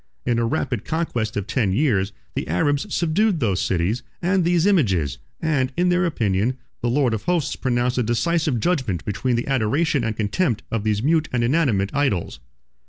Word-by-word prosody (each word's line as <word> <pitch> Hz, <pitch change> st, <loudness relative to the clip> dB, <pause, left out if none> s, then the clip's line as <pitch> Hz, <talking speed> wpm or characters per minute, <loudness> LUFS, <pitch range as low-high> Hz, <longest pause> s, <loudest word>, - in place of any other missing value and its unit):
In 120 Hz, -1 st, +1 dB
a 115 Hz, -, +1 dB
rapid 115 Hz, -1 st, -1 dB
conquest 125 Hz, -11 st, -2 dB
of 100 Hz, -, -2 dB
ten 110 Hz, -3 st, 0 dB
years, 100 Hz, -7 st, +1 dB, 0.2 s
the -, -, -3 dB
Arabs 145 Hz, -, 0 dB
subdued 175 Hz, +3 st, +1 dB
those 100 Hz, -8 st, 0 dB
cities 95 Hz, +7 st, 0 dB, 0.2 s
and 185 Hz, +1 st, +1 dB
these 175 Hz, 0 st, +2 dB
images; 95 Hz, -, +2 dB, 0.2 s
and, 140 Hz, -5 st, 0 dB
in 180 Hz, +1 st, +3 dB
their 180 Hz, 0 st, +2 dB
opinion, 110 Hz, -, 0 dB, 0.2 s
the 120 Hz, -, 0 dB
Lord 125 Hz, -2 st, +2 dB
of 110 Hz, -1 st, -4 dB
Hosts 175 Hz, -5 st, 0 dB
pronounced 125 Hz, -1 st, 0 dB
a -, -, +3 dB
decisive 130 Hz, +4 st, 0 dB
judgment 130 Hz, -, -1 dB
between 105 Hz, +5 st, -1 dB
the 120 Hz, -, -1 dB
adoration 135 Hz, +3 st, +1 dB
and 110 Hz, -1 st, -2 dB
contempt 115 Hz, -, 0 dB
of 115 Hz, -2 st, -1 dB
these 105 Hz, 0 st, 0 dB
mute 155 Hz, +1 st, +2 dB
and 120 Hz, -2 st, 0 dB
inanimate 120 Hz, -8 st, +1 dB
idols. 135 Hz, -, -1 dB
125 Hz, 175 wpm, -22 LUFS, 105-160 Hz, 0.2 s, in